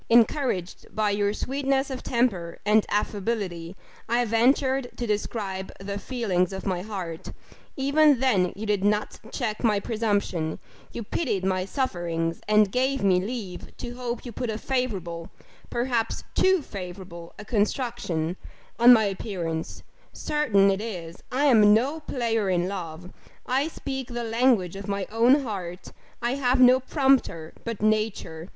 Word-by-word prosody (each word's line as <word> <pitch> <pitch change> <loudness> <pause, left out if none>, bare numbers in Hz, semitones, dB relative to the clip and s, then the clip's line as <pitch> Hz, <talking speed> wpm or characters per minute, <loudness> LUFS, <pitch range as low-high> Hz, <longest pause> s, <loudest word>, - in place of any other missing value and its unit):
encouraged 230 - +2
by 215 -1 +2
your 205 0 +1
sweetness 270 +4 -1
of 260 - -4
temper 205 -9 0
and 210 0 +4
affability, 200 -4 -2 0.3
I 240 +1 +2
ventured 260 +3 +2
to 240 - -2
describe 205 -3 -3
the 200 +1 -4
feelings 200 -6 0
of 190 - -6
my 185 -3 -1
heart 185 -5 -6 0.5
even 280 0 +4
then 205 -9 +2
you 215 - -5
did 205 -2 0
not 210 +1 0
check 220 -4 -3
my 215 -3 +3
presumption 200 -8 -1 0.3
you 235 - -5
pitied 205 - -1
my 185 -1 0
sufferings 170 -8 -2
and 210 -2 +4
gave 265 +2 +1
me 185 -2 +4
leave 200 -5 -6
to 240 - -6
hope 245 0 -4
you 240 - -6
put 235 +2 -4
a 215 - -2
favourable 195 -11 -3 0.4
perhaps 240 -2 -1
too 375 -4 +3
favourable 180 -4 -8
a 210 - -9
construction, 205 - -1 0.4
on 240 +1 +9
my 225 -3 +7
appearance 185 -5 -3 0.3
certain 210 -10 +2
it 195 +1 -1
is, 175 -7 -6
I 270 +4 +1
am 215 -6 +7
no 275 +8 0
player 230 -8 -1
in 175 -1 +1
love 180 -2 -6 0.3
I 265 +4 +1
speak 270 -5 -5
the 240 0 -4
language 225 -6 +2
of 195 0 -7
my 200 -1 -2
own 245 +6 +4
heart; 185 -6 -6 0.3
and 250 +4 0
have 255 -1 +2
no 255 0 +7
prompter 260 - +1
but 230 -3 -4
nature. 215 -6 -1
215 Hz, 145 wpm, -26 LUFS, 185-250 Hz, 0.5 s, on